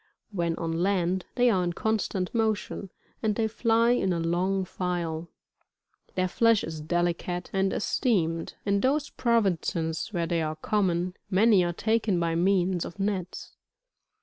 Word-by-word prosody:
When 170 -4 -1
on 165 -1 -3
land, 180 +1 0
they 245 -1 +4
are 185 -4 +2
in 175 -1 -1
constant 205 -3 -1
motion, 220 -3 -1 0.3
and 215 -2 +1
they 225 0 +1
fly 230 +1 +2
in 245 -6 +2
a 170 - 0
long 185 +3 0
file. 170 -3 -3 0.9
Th^ir 185 0 +2
flesh 230 +3 +3
is 160 -1 -5
delicate 175 +2 -1
and 195 0 +1
esteemed: 170 - 0
in 200 0 +2
those 285 +5 +1
provinces 175 -8 0
where 170 -4 -1
they 165 0 0
are 155 0 -2
common, 180 0 0 0.2
many 200 0 +5
are 175 - 0
taken 215 0 +1
by 170 -1 0
means 180 0 +2
of 175 - -9
nets. 195 -3 -3
185 Hz, 150 wpm, -27 LUFS, 170-210 Hz, 0.9 s, many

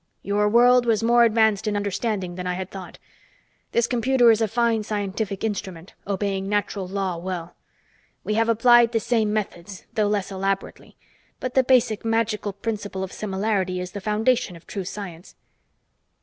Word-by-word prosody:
"Your 205 +1 +1
world 245 +2 +5
was 225 -1 +2
more 235 +1 +5
advanced 220 -2 +2
in 210 - 0
understanding 200 -2 -2
than 180 0 -5
I 180 - -1
had 185 +1 -6
thought. 190 -2 -9 0.7
This 235 - +2
computer 245 0 +4
is 225 0 +2
a 220 - +2
fine 230 +1 +1
scientific 205 -1 -3
instrument, 190 -5 -4
obeying 195 -1 -2
natural 205 -2 -1
law 190 -2 -2
well. 175 -1 -5 0.7
We 215 - -2
have 225 +1 +1
applied 235 +1 +5
the 225 - +2
same 220 -2 0
methods, 200 -3 -4
though 215 -1 +1
less 205 -1 -1
elaborately. 195 0 -4 0.4
But 255 -1 -4
the 265 - +4
basic 245 -4 +2
magical 225 -2 0
principle 205 -2 -4
of 190 - -6
similarity 195 -2 -1
is 180 0 -5
the 200 - -7
foundation 215 -1 +1
of 165 - -15
true 195 -3 -5
science." 180 -3 -8
210 Hz, 165 wpm, -23 LUFS, 190-225 Hz, 0.7 s, world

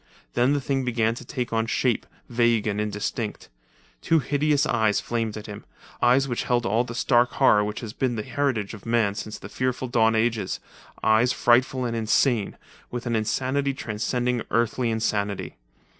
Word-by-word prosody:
Then 125 +4 +3
the 145 - +1
thing 135 0 -1
began 115 -2 +1
to 120 - -9
take 120 -1 -4
on 115 0 +1
shape, 120 -1 0 0.2
vague 120 -2 +2
and 105 -1 -1
indistinct. 105 - -4 0.5
Two 165 - +3
hideous 145 +1 +1
eyes 110 -7 +2
flamed 115 -2 -2
at 105 - -8
him—eyes 120 +5 -1
which 120 -3 -2
held 120 -1 +1
all 110 +5 +2
the 120 -1 -7
stark 120 0 +3
horror 105 0 +4
which 105 0 -4
has 110 -3 -6
been 130 -3 -1
the 110 - -3
heritage 125 -7 -1
of 105 - -10
man 115 -3 +2
since 105 +1 -6
the - - -9
fearful 130 +3 -2
dawn 115 -2 +3
ages—eyes 110 +1 0
frightful 125 +1 +2
and 115 -1 -2
insane, 115 0 +1 0.3
with 120 0 -5
an 120 -1 0
insanity 130 +5 0
transcending 120 +2 -1
earthly 120 +1 +1
insanity. 105 - -2
120 Hz, 165 wpm, -25 LUFS, 110-125 Hz, 0.5 s, horror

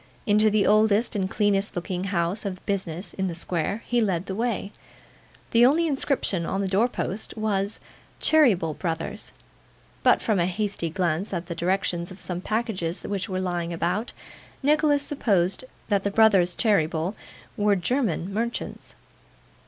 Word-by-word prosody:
Into 215 -1 +4
the 210 -1 +2
oldest 215 +2 +3
and 190 -2 -1
cleanest 205 -1 +1
looking 180 +1 -3
house 185 +1 0
of 195 -3 -5
business 185 -2 -2
in 190 -1 -2
the 170 - -4
square, 175 +5 -2
he 240 -1 +1
led 190 -4 0
the 190 - -4
way. 220 -1 -2 0.8
The 235 +1 +5
only 300 +7 +5
inscription 270 - +1
on 190 - -2
the 195 - -1
door 200 +5 +3
post 215 -2 -4
was 205 -1 -1 0.4
'Cheeryble, 205 - +3
Brothers;' 165 +4 -4 0.7
but - - +5
from 215 -4 0
a 170 - +2
hasty 195 -2 -2
glance 175 +2 -1
at 170 +1 -3
the 170 - -5
directions 175 0 -1
of 190 - -11
some 180 -1 -4
packages 210 -6 -2
which 200 -1 -3
were 185 -1 -2
lying 175 -2 -2
about, 180 +7 -1 0.5
Nicholas 295 0 +3
supposed 200 -7 0 0.2
that 200 -2 +2
the 200 - +1
brothers 195 -5 +4
Cheeryble 170 -4 +1 0.4
were 205 -1 +3
German 195 - -1
merchants. 235 +3 -4
195 Hz, 150 wpm, -25 LUFS, 175-220 Hz, 0.8 s, The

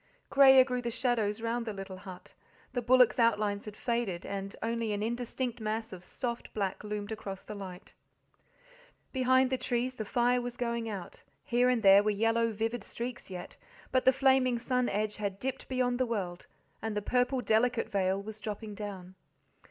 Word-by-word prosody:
Greyer 265 -1 +8
grew 250 -1 -2
the 240 - -2
shadows 230 -3 0
round 230 +1 -1
the 215 - -2
little 195 -1 -8
but, 185 -2 -10 0.4
the 245 - 0
bullocks' 250 0 +5
outlines 210 -3 +2
had 210 -1 -8
faded, 235 -8 -2
and 195 0 -5
only 230 -1 -1
an 205 0 -2
indistinct 240 +1 -3
mass 220 0 -3
of 180 -1 -9
soft 240 +4 -5
black 200 -2 -2
loomed 210 0 -4
across 200 -3 -6
the 215 - -7
light. 190 -3 -9 1.2
Behind 260 0 +3
the 260 - 0
trees 245 +1 -1
the 225 - -4
fire 245 +2 +2
was 245 0 -6
going 235 -1 -2
out, 195 -5 -7 0.2
here 245 +1 +3
and 245 -3 +1
there 195 0 +8
were 210 - +1
yellow, 225 +2 +2
vivid 225 +1 -2
streaks 240 +1 -6
yet, 180 -2 -8 0.3
but 255 0 +2
the 260 - +7
flaming 265 -2 +3
sun 250 +1 0
edge, 210 +1 -1
had 200 -2 -3
dipped 265 +4 -4
beyond 250 -1 0
the 255 - +2
world, 185 -6 -3 0.3
and 220 -1 -3
the - - 0
purple, 250 +3 +1
delicate 240 0 +2
veil 190 -1 +1
was 215 +2 -8
dropping 215 0 -5
down. 195 -3 -7
225 Hz, 180 wpm, -31 LUFS, 205-245 Hz, 1.2 s, Greyer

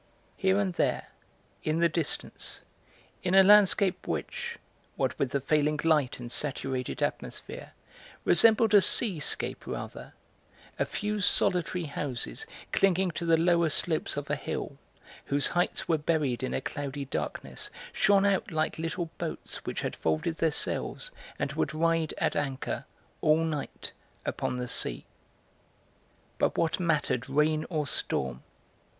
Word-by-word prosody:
Here 190 0 +2
and 195 -3 0
there, - - 0 0.5
in 155 +1 0
the 170 0 +4
distance, 165 -2 -3 0.6
in 180 +1 +1
a 195 - +9
landscape 200 -1 +5
which, - - -4 0.4
what - - 0
with 135 - +1
the 140 - 0
failing 150 +2 +1
light 150 -7 +2
and 120 -1 -7
saturated 130 -1 -1
atmosphere, - - -4 0.5
resembled 220 +4 +6
a 205 - +8
seascape 185 -5 +2
rather, - - -6 0.7
a - - +2
few 210 0 -2
solitary 180 -2 +2
houses 145 - -4 0.2
clinging 190 -1 +2
to 170 +1 -4
the 165 -1 +5
lower 170 0 +3
slopes 155 0 0
of 145 0 -4
a - - +2
hill 140 -1 -5 0.5
whose 140 0 0
heights 175 0 -1
were 165 -2 +2
buried 145 -6 0
in 130 - -2
a - - -1
cloudy 140 0 -4
darkness 135 - -3 0.2
shone 200 0 +4
out 195 -2 +1
like 160 -1 -1
little 165 0 -3
boats - - -5
which - - -3
had - - -3
folded 80 - -1
their 165 - +2
sails - - +1 0.3
and - - -2
would - - -1
ride 165 0 +1
at - - 0
anchor, 135 -2 -3 0.4
all 155 +1 +4
night, 155 -3 -4 0.3
upon 125 - -2
the 125 0 -3
sea. - - +2 1.3
But - - +1
what 165 +2 +1
mattered 145 -7 0
rain 155 +2 +2
or 155 -4 -1
storm? 65 - -2
160 Hz, 140 wpm, -29 LUFS, 140-180 Hz, 1.3 s, a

